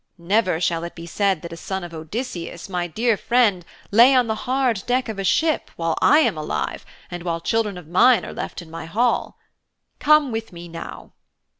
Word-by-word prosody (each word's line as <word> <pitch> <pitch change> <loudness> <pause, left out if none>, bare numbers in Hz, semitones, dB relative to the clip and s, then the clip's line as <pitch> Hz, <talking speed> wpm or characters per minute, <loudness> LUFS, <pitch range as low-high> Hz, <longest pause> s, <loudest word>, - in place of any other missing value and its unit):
Never 185 0 +1
shall 170 -1 0
it 170 - -7
be 165 - -9
said 190 0 0
that 170 - -7
a - - -6
son 190 +3 -5
of 175 -1 -8
Odysseus, 170 +1 -6
my 180 -2 -2
dear 225 +6 +1
friend, 220 -5 +2 0.3
lay 240 +6 +7
on 250 -1 +4
the 220 - -1 0.2
hard 255 -6 +1
deck 250 +1 +1
of 215 -3 -5
a - - -2
ship 300 - +1
while 165 -1 -1
I 300 +2 +6
am 300 - +2
alive 155 0 -3 0.3
and 175 0 -5
while 170 -1 -2
children 210 +1 -1
of 175 -4 -11
mine 225 +8 +4
are - - -7
left - - -6
in 160 - -16
my 165 - -7
hall. 235 +9 0 0.6
Come 300 -3 +4
with 225 0 -4
me 175 -1 -10
now.' 165 0 -9
190 Hz, 200 wpm, -22 LUFS, 170-235 Hz, 0.6 s, lay